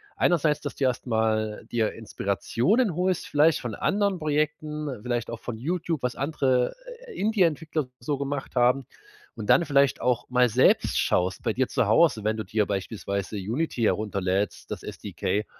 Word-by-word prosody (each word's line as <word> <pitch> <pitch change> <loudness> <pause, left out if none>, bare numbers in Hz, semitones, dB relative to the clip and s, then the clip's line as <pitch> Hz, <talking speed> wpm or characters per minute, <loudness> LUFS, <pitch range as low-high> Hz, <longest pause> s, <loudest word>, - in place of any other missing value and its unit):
Einerseits, 155 -4 +2
dass 145 - -5
du 135 - 0
erstmal 110 -3 0
dir 115 -2 +1
Inspirationen 120 - 0
holst, 180 0 0
vielleicht 150 +2 +3
von 120 -4 -5
anderen 200 -2 +1
Projekten, 150 -4 -2
vielleicht 120 -1 -2
auch 115 - -5
von 120 -3 -6
YouTube, 165 +3 -2
was 125 0 -1
andere, 135 -3 +1 0.3
äh, 465 - -9
Indie-Entwickler 165 - +1
so 140 +4 -2
gemacht 140 0 -4
haben. 125 +1 +3 0.5
Und 105 - 0
dann 175 - +6
vielleicht 140 -2 +3
auch 125 -1 0
mal 125 -1 +4
selbst 125 +4 +3
schaust 90 +2 0
bei 115 - 0
dir 130 +2 +1
zu - - +1
Hause, 150 -11 +4
wenn 110 +1 0
du 110 - -3
dir 105 +2 0
beispielsweise 100 0 -3
Unity 120 - -2
herunterlädst, 100 -2 -1
das - - -4
SDK, 105 +1 -3
125 Hz, 160 wpm, -26 LUFS, 110-155 Hz, 0.5 s, dann